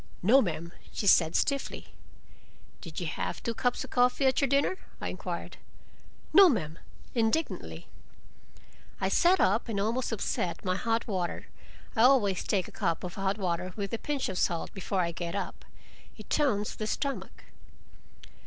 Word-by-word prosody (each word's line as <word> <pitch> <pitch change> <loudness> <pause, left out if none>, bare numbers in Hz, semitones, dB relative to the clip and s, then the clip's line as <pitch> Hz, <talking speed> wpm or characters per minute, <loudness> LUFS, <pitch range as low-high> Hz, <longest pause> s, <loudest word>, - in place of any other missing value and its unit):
"No, 250 +9 +6
ma'm," 170 -4 -3 0.2
she - - -4
said 165 -4 +5
stiffly. 280 -1 -1 0.9
"Did - - -7
you - - -3
have - - -4
two 235 - -1
cups 245 +2 0
of - - -11
coffee 250 +2 +3
at 260 +2 +3
your 275 - +3
dinner?" 280 +7 +1 0.2
I - - -3
inquired. - - -5 0.8
"No, 390 -2 +9
ma'm," 165 - -2 0.3
indignantly. 235 +7 -1 1.1
I - - 0
sat 365 +2 +4
up 215 +5 +2
and 205 -3 -1
almost 230 +6 0
upset 185 -5 -2
my 185 0 +1
hot 225 +3 -1
water—I 190 +4 -5
always 230 -7 +4
take 190 -4 0
a - - -12
cup 165 - -1
of 180 -1 -5
hot 195 +1 -1
water 180 -1 -2
with 200 -1 -4
a 230 - -1
pinch 290 -2 -2
of 190 -2 -3
salt, 170 -1 -1
before 195 -1 -1
I 170 -1 0
get 170 +1 -5
up. 200 - -5 0.5
It - - -13
tones 225 -9 +1
the 215 - -3
stomach. 275 +5 -3
210 Hz, 160 wpm, -29 LUFS, 185-255 Hz, 1.1 s, No